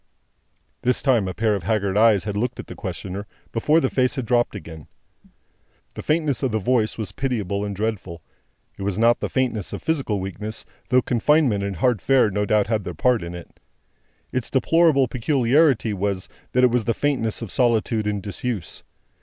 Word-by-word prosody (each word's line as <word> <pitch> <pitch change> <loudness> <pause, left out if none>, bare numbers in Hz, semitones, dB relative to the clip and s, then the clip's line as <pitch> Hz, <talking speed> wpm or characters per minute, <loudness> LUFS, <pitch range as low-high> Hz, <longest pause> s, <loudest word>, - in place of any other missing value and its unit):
This 125 +1 +1
time, 120 -8 +3
a 95 - -3
pair 110 -1 +1
of 100 - -2
haggard 100 +1 0
eyes 110 -3 +5
had 105 0 -4
looked 120 +4 -2
at - - -6
the - - -9
questioner, 95 +1 -6 0.2
before 150 +8 +3
the 135 - +1
face 130 -1 +1
had 130 -4 -3
dropped 120 -1 +1
again. 80 -5 -9 1.1
The - - -7
faintness 155 -4 0
of 130 -3 0
the 110 - 0
voice 110 +1 +1
was 110 -3 -4
pitiable 105 -7 -2
and 100 -1 -4
dreadful. 95 -6 -4 0.6
It - - -7
was 100 -1 -2
not 115 +1 +4
the - - -3
faintness 120 -7 -1
of - - -6
physical 135 -10 0
weakness, 105 +3 -5 0.2
though 125 0 +4
confinement 125 -3 +2
and 100 -1 -3
hard 120 +3 +1
fare 130 -6 +3
no 105 +1 -1
doubt 105 -1 +3
had 110 -1 -1
their - - -6
part 125 -4 +2
in 85 +1 -6
it. 85 - -12 0.7
Its 130 -2 -2
deplorable 145 -1 +3
peculiarity 130 -1 +2
was, 100 -1 -2 0.3
that 125 - +3
it 125 - +5
was 120 -3 +1
the 115 - 0
faintness 125 -6 -1
of 110 - -4
solitude 115 -3 +1
and 105 -2 -2
disuse. 105 -1 -4
110 Hz, 185 wpm, -23 LUFS, 100-125 Hz, 1.1 s, eyes